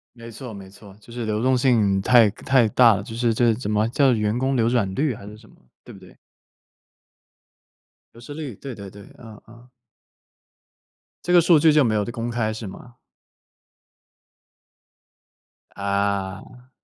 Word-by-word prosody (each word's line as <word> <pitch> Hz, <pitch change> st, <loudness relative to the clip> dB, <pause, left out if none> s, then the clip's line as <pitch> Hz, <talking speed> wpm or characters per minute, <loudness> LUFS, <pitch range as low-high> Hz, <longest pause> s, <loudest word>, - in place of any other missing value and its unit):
没 115 Hz, 0 st, -11 dB
错 120 Hz, +1 st, -9 dB
没 100 Hz, -2 st, -11 dB
错， 100 Hz, 0 st, -16 dB
就 115 Hz, -, -16 dB
是 120 Hz, -1 st, -5 dB
流 110 Hz, +1 st, -2 dB
动 130 Hz, 0 st, +2 dB
性 110 Hz, -7 st, +2 dB
太 120 Hz, -2 st, +5 dB
太 120 Hz, +2 st, +1 dB
大 120 Hz, -1 st, +5 dB
了， 100 Hz, -, -4 dB
就 110 Hz, -, -10 dB
是 120 Hz, -1 st, 0 dB
这 115 Hz, 0 st, +2 dB
怎 110 Hz, -2 st, -5 dB
么 105 Hz, +1 st, +1 dB
叫 135 Hz, +1 st, +2 dB
"员 105 Hz, 0 st, -1 dB
工 130 Hz, +1 st, -1 dB
流 115 Hz, -1 st, +1 dB
转 110 Hz, -6 st, 0 dB
率" 140 Hz, -4 st, -1 dB
还 100 Hz, -, -12 dB
是 105 Hz, +1 st, -11 dB
什 110 Hz, -, -19 dB
么， -, -, -22 dB, 0.3 s
对 -, -, -12 dB
不 -, -, -14 dB
对？ -, -, -18 dB, 2.0 s
流 115 Hz, -, -15 dB
失 135 Hz, +5 st, -10 dB
率， 145 Hz, -7 st, -7 dB
对 135 Hz, -3 st, -8 dB
对 100 Hz, -2 st, -10 dB
对， 100 Hz, +1 st, -14 dB, 0.2 s
嗯 110 Hz, -3 st, -13 dB
嗯。 120 Hz, +2 st, -17 dB, 1.6 s
这 175 Hz, -, -1 dB
个 175 Hz, -, +7 dB
数 165 Hz, -1 st, +4 dB
据 155 Hz, 0 st, +4 dB
就 150 Hz, -1 st, +4 dB
没 110 Hz, -2 st, 0 dB
有 105 Hz, -1 st, 0 dB
的 120 Hz, -, -7 dB
公 120 Hz, -1 st, -4 dB
开 110 Hz, -2 st, -2 dB
是 110 Hz, -1 st, -7 dB
吗？ 120 Hz, +5 st, -12 dB, 2.8 s
啊。 100 Hz, +4 st, -4 dB
115 Hz, 185 characters per minute, -22 LUFS, 105-125 Hz, 2.8 s, 个